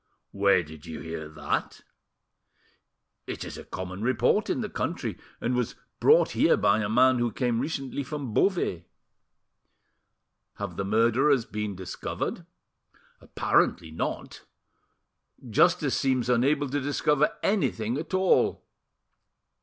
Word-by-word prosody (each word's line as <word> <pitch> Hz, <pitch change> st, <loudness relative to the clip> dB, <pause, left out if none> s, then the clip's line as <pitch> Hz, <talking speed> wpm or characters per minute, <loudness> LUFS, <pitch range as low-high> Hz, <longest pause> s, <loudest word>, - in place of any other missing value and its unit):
"Where 100 Hz, -3 st, +3 dB
did 80 Hz, -1 st, -12 dB
you 80 Hz, -, -6 dB
hear 80 Hz, 0 st, -6 dB
that?" 75 Hz, -1 st, -3 dB, 1.5 s
"It -, -, -5 dB
is -, -, -7 dB
a -, -, -8 dB
common 95 Hz, +1 st, -6 dB
report 125 Hz, +1 st, +2 dB
in -, -, 0 dB
the -, -, -2 dB
country, -, -, -3 dB, 0.2 s
and 120 Hz, -, -1 dB
was 125 Hz, -2 st, -1 dB, 0.2 s
brought -, -, +5 dB
here -, -, +3 dB
by 100 Hz, +1 st, +3 dB
a 105 Hz, -2 st, -1 dB
man 130 Hz, +2 st, +4 dB
who 120 Hz, -1 st, 0 dB
came 120 Hz, -2 st, 0 dB
recently 135 Hz, 0 st, -3 dB
from 140 Hz, -4 st, -5 dB
Beauvais." 105 Hz, -, +1 dB, 1.7 s
"Have -, -, -5 dB
the 100 Hz, -, -3 dB
murderers 115 Hz, +5 st, +3 dB
been 105 Hz, -1 st, -4 dB
discovered?" 90 Hz, 0 st, -5 dB, 0.7 s
"Apparently 80 Hz, -2 st, +1 dB
not; 80 Hz, -, -4 dB, 1.0 s
justice -, -, +3 dB
seems 130 Hz, -3 st, +1 dB
unable 140 Hz, +4 st, +2 dB
to 145 Hz, +2 st, -1 dB
discover 145 Hz, +1 st, +1 dB
anything 125 Hz, -, 0 dB
at 165 Hz, +4 st, -4 dB
all." 185 Hz, 0 st, +2 dB
120 Hz, 120 wpm, -27 LUFS, 100-140 Hz, 1.7 s, brought